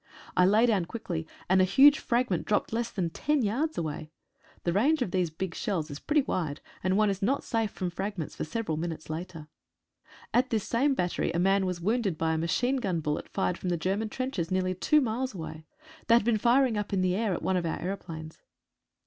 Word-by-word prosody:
I 180 - +5
lay 215 +4 +5
down 205 -7 +2
quickly, 170 -6 -5 0.2
and 185 +1 +4
a - - +6
huge 280 +10 +6
fragment 235 -8 0
dropped 210 +1 0
less 235 +1 -1
than 175 -5 -2
ten 295 - 0
yards 270 +10 -1
away. 155 -1 -4 0.5
The 170 - 0
range 270 - +3
of 190 - -5
these 180 -2 +1
big 165 +2 -4
shells 165 -7 -2
is 145 - -6
pretty 300 -2 +2
wide, 155 - -2 0.2
and 185 +1 +2
one 210 -1 +4
is 195 +1 -5
not 265 +8 +1
safe 225 -2 0
from 185 -3 -4
fragments 190 -3 -4
for - - -3
several 160 -2 -3
minutes 160 -1 -4
later. 165 -1 -6 0.9
At 255 +2 +3
this 220 -4 -1
same 270 +4 +2
battery 180 -6 -1
a - - -1
man 190 +2 +3
was 180 -1 -3
wounded 205 -3 0
by 160 0 +1
a - - 0
machine 245 +11 +1
gun 190 -9 -1
bullet, 150 -1 -3
fired 185 -2 -1
from 180 - -3
the 175 - +1
Ger 185 +4 0
man 220 +1 -3
trenches 255 -10 -3
nearly 185 0 0
two 300 - +3
miles 250 0 -2
away. 160 -2 -7 0.4
They 230 - +6
had 235 -2 +3
been 230 -2 +2
firing 240 -1 +3
up 205 -1 -4
in 190 - +2
the 185 -1 +2
air 210 -3 0
at - - -6
one 190 - +1
of 175 -2 0
our 160 - -2
aeroplanes. 165 -4 -6
190 Hz, 220 wpm, -28 LUFS, 170-230 Hz, 0.9 s, a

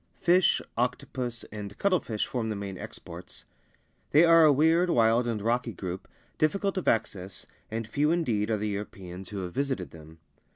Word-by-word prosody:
Fish, 180 0 +3
octopus, 120 0 -2
and 105 -1 -7
cuttlefish 180 - 0
form 115 -3 -3
the 110 - -2
main 100 -1 -5
exports. - - -10 0.6
They 155 +3 +6
are 165 -1 +7
a 150 - +7
weird, 160 +5 +3
wild, 115 -3 +3
and 115 -2 -1
rocky 120 0 0
group, 90 0 -6 0.3
difficult 195 +6 +1
of 185 - -3
access, 95 -4 -1 0.2
and 115 +1 -3
few 145 +6 +1
indeed 120 -11 0
are 110 - +1
the 105 +1 -2
Europeans 95 -2 -7
who 100 -2 -4
have 90 -1 -6
visited 130 - -2
them. 80 0 -13
115 Hz, 165 wpm, -28 LUFS, 100-150 Hz, 0.6 s, are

